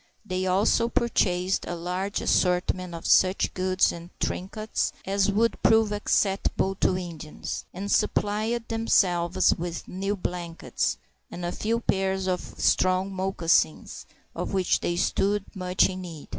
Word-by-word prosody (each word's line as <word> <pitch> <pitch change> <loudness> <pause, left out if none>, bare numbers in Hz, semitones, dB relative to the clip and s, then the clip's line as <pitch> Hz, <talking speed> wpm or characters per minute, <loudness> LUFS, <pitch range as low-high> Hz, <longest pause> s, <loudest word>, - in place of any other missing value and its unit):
They 185 -2 -2
also 205 +5 +2
purchased 185 -6 +1
a 175 - -3
large 180 +4 -3
assortment 180 -1 +1
of 165 - -8
such 185 +1 +3
goods 185 0 +2
and 170 0 -9
trinkets 215 +4 -2
as 195 +1 +1
would 230 +3 +1
prove 220 -1 +4
acceptable 195 -2 +1
to 185 - +2
Indians, 165 -4 -6
and 200 +3 -5
supplied 215 +2 0
themselves 185 -5 +2
with 170 0 -5
new 195 +2 -2
blankets, 175 -3 -3 0.3
and 175 - -6
a 175 - -2
few 230 +5 -1
pairs 190 -2 0
of 185 -1 0
strong 185 +1 +1
moccasins, 170 - 0 0.3
of - - -4
which 190 -2 +2
they 175 - -1
stood 200 +3 +1
much 185 -1 +2
in 185 0 -6
need. 165 -5 -9
185 Hz, 135 wpm, -26 LUFS, 180-200 Hz, 0.3 s, prove